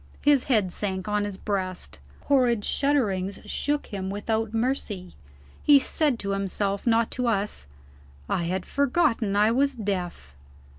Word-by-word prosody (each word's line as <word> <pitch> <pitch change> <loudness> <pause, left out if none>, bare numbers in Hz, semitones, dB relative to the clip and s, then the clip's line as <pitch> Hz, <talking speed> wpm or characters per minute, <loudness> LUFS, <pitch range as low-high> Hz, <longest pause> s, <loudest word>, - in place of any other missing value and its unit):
His 290 -3 +4
head 210 -9 +2
sank 190 -2 -3
on 210 0 0
his 200 -2 -5
breast; 185 - -4 0.2
horrid 245 -6 +2
shudderings 205 -10 0
shook 290 0 -1
him 190 -1 -3
without 220 +2 -1
mercy; 225 -6 -2 0.5
he 290 -1 +7
said 285 -1 +1
to 200 -3 -3
himself 195 +1 -1
not 230 0 +3
to 250 -1 -1
us: 200 - -1 0.6
"I 170 - 0
had 185 +2 -2
forgotten 275 - +1
I 210 +2 +4
was 275 +3 +2
deaf." 180 - -4
210 Hz, 140 wpm, -26 LUFS, 190-250 Hz, 0.6 s, he